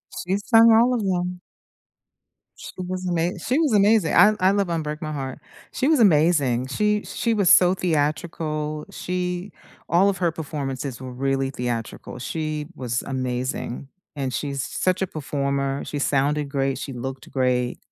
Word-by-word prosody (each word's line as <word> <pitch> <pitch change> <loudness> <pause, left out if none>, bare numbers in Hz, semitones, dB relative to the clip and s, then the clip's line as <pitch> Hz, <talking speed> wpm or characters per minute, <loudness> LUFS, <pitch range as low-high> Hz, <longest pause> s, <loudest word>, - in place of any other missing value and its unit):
She's 195 +3 -3
sung 230 -1 +7
all 235 +3 +5
of 230 -4 -1
them. 180 -1 -1 1.2
She - - -9
was 185 0 -4
ama 175 +1 0
she 255 - 0
was 310 -6 +2
amazing. 205 -3 +4
I 210 +1 +7
I 185 - +4
love 200 -1 +1
"Un-break 155 -2 -3
My 155 -1 -4
Heart." 135 -3 -5 0.4
She 265 - 0
was 310 -3 +4
amazing, 150 - +3
she 210 +8 0
she 230 -1 -1
was 200 -4 +4
so 180 0 +6
theatrical, 155 -2 -2
she 180 +1 -3 0.4
all 185 +4 +4
of 195 - -1
her 175 -2 +1
performances 140 -5 -5
were 130 -1 -7
really 135 +1 -1
theatrical, 120 -2 -4
she 155 +3 -3
was 120 -2 -2
amazing, 130 0 -3 0.3
and 135 -3 -3
she's 140 -1 -2
such 185 0 0
a - - -1
performer, 140 -3 -2
she 145 - -4
sounded 145 +1 +1
great, 135 -1 -1
she 135 - -6
looked 130 +2 -6
great, 125 -2 0
155 Hz, 155 wpm, -23 LUFS, 135-185 Hz, 1.2 s, sung